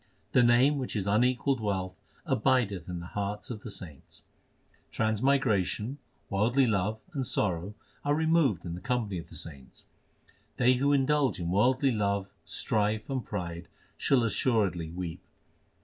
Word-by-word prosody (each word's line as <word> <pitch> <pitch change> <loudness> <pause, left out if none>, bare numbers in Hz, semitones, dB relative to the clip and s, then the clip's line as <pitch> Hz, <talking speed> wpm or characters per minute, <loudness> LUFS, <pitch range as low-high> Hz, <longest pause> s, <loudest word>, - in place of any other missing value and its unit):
The 125 - +5
Name, 125 +4 +4
which 130 - -4
is 100 -3 -1
unequalled 125 +5 +2
wealth, 95 -4 -2 0.3
abideth 110 -7 +1
in 90 -1 -4
the - - -7
hearts 105 +3 -3
of 110 -3 -6
the 115 - -7
saints. 85 -8 -10 0.7
Transmigration, 110 - +1 0.3
worldly 120 +7 +2
love, 105 -1 0 0.2
and 140 -3 -1
sorrow 95 0 -1 0.3
are 145 0 +2
removed 160 - +2
in 85 - -4
the 90 - -7
company 120 -7 -1
of 80 - -10
the - - -12
saints. 75 -5 -11 0.7
They 125 +1 +5
who 140 +3 +2
indulge 140 -2 +2
in 85 0 -2
worldly 130 +7 +3
love, 100 -3 0 0.2
strife, 110 +3 -1
and 130 -3 -1
pride 85 -4 -5 0.3
shall 130 -3 +2
assuredly 100 -7 +1
weep. 85 -1 -5
110 Hz, 145 wpm, -29 LUFS, 95-130 Hz, 0.7 s, The